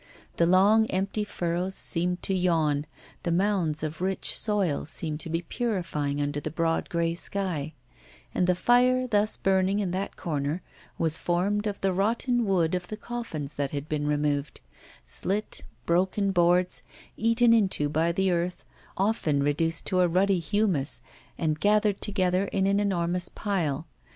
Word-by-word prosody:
The 170 - +4
long 205 +5 +5
empty 195 +2 -1
furrows 180 -1 -2
seemed 180 +1 +1
to 195 - 0
yawn, 160 -5 +1 0.3
the 170 - -2
mounds 175 -4 +1
of 155 +2 -4
rich 190 +1 -1
soil 200 -8 0
seemed 155 0 -2
to 165 - -3
be 165 +1 -2
purifying 170 - -2
under 145 0 -1
the 150 - -4
broad 165 +1 -1
grey 170 -1 0
sky; 170 -4 -2 0.6
and 180 - +1
the 180 - +3
fire 250 +6 +3
thus 215 -3 +2
burning 190 +1 +2
in 200 -4 -1
that 190 +2 -3
corner 150 +1 -3 0.3
was 160 -1 0
formed 200 +5 0
of 205 -1 -3
the 195 -1 +1
rotten 235 +5 +1
wood 180 -5 +1
of 180 -1 -2
the 215 - -6
coffins 210 -12 -5
that 140 -1 -2
had 145 +1 -5
been 150 -1 -2
removed 145 -1 -1 0.4
slit, 205 +3 -1 0.2
broken 190 +3 +1
boards, 180 0 +2 0.3
eaten 230 +1 +4
into 195 -9 +2
by 160 +3 +1
the 190 +2 +1
earth, 175 +1 -2 0.3
often 185 -8 +1
reduced 165 +3 0
to 185 - +1
a 180 - +4
ruddy 185 +2 +2
humus, 170 -4 0 0.4
and 155 -2 -1
gathered 210 0 +2
together 185 -2 +1
in 195 -1 0
an 200 +1 +2
enormous 180 -3 0
pile. 165 -8 -2
180 Hz, 155 wpm, -27 LUFS, 160-200 Hz, 0.6 s, long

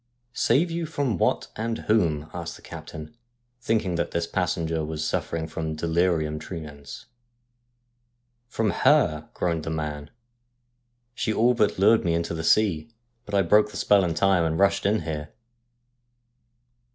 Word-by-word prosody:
' 120 0 -47
Save 160 +9 +3
you 165 -1 -2
from 145 -7 -1
what - - +1
and 115 +1 -2
whom? 80 -9 +1
' - - -25
asked - - -5
the - - -16
captain, 75 +8 -9 0.5
thinking 110 -7 0
that 85 - -2
his 85 0 -1
passenger 85 -2 -1
was 80 0 -3
suffering 80 -1 -2
from 80 -1 -4
delirium 80 -1 0
tremens. 75 -3 -9 0.7
' 120 0 -48
From 110 -3 0
her,' 75 -2 +2
groaned 85 -3 -1
the - - -4
man. 75 -2 -4 0.5
' 120 0 -48
She 120 - -1
all 120 +3 +3
but 105 -4 +1
lured 110 +4 +4
me 85 -1 +1
into 85 0 -2
the 80 0 -4
sea, 95 -3 +2 0.4
but 105 - -3
I 100 - +4
broke 105 +4 +4
the - - -8
spell 100 -2 +4
in 85 -3 -1
time, 95 0 +3
and 80 0 0
rushed 100 +1 +2
in 105 0 +1
here.' 75 -1 -5
90 Hz, 165 wpm, -25 LUFS, 80-115 Hz, 0.7 s, lured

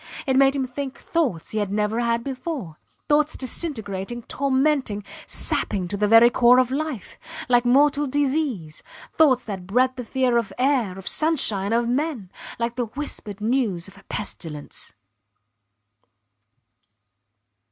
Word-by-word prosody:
It 265 -2 +1
made 270 +1 +5
him 270 -2 0
think 265 +1 -6
thoughts 270 - -2
he 215 - -1
had 205 -2 -2
never 210 +2 0
had 235 -1 0
before; 260 - -5 0.3
thoughts 300 +1 +2
disintegrating, 240 - -3
tormenting, 270 -6 0 0.2
sapping 190 -4 +1
to 205 - -2
the 210 +1 +1
very 225 +3 +7
core 245 +1 +5
of 255 -1 +3
life 290 -5 -4 0.3
like 245 0 +3
mortal 285 +3 +3
disease; 270 - -1 0.3
thoughts 265 -6 +4
that 190 -4 -6
bred 255 +5 +2
the 250 - -4
fear 250 0 +1
of 230 -4 -1
air, 250 -8 +1
of 190 - -9
sunshine, 225 -11 +2
of 235 +1 +1
men 250 - -2 0.3
like 235 +1 -3
the 245 - 0
whispered 220 -5 -6
news 215 -7 0
of 195 - -15
a 200 - -16
pestilence. 160 - -6
245 Hz, 140 wpm, -23 LUFS, 205-275 Hz, 0.3 s, very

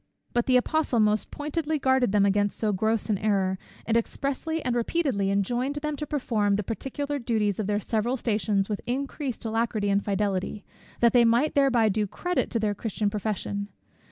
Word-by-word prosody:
But 240 0 +1
the 255 -1 +5
Apostle 280 -1 +1
most 215 0 +2
pointedly 305 +1 -2
guarded 260 -5 +2
them 205 -1 +4
against 205 0 +1
so 215 -2 0
gross 220 +3 0
an 210 -4 0
error, 190 -3 +1 0.3
and 225 - +1
expressly 280 +7 -1
and 245 -1 +1
repeatedly 240 - 0
enjoined 240 +8 0
them 300 0 -2
to 300 - -4
perform 220 -8 +1
the 210 - -1
particular 280 +7 -3
duties 220 -5 0
of 210 - -1
their 205 0 +1
several 225 +4 -1
stations 210 -4 0
with 210 -2 -3
increased 265 0 -3
alacrity 220 -2 0
and 200 +1 +2
fidelity, 200 0 -1 0.4
that 235 -1 +5
they 245 -1 +6
might 235 +6 +3
thereby 260 -5 +4
do 210 0 0
credit 355 - -1
to 230 - -1
their 210 -1 0
Christian 210 0 -2
profession. 205 -1 -3
225 Hz, 180 wpm, -26 LUFS, 205-265 Hz, 0.4 s, they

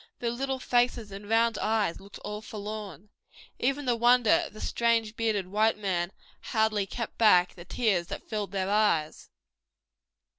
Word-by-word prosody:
Their 235 -1 -2
little 265 +2 -2
faces 240 -4 0
and 200 +1 -9
round 230 0 +2
eyes 215 -5 0
looked 200 +1 -12
all 210 +1 -5
forlorn. 210 -3 -7 0.5
Even 275 +3 0
the 245 -2 +2
wonder 240 -1 +4
of - - -17
the 215 - -11
strange 230 -2 0
bearded 220 -4 0
white 215 +3 +2
man 185 -4 -1 0.3
hardly 220 -3 0
kept 230 +3 -6
back 180 -5 +5
the 175 - -12
tears 190 -5 0
that 200 - -7
filled 210 -3 -3
their 190 -1 -1
eyes. 205 -8 +1
215 Hz, 155 wpm, -28 LUFS, 200-230 Hz, 0.5 s, back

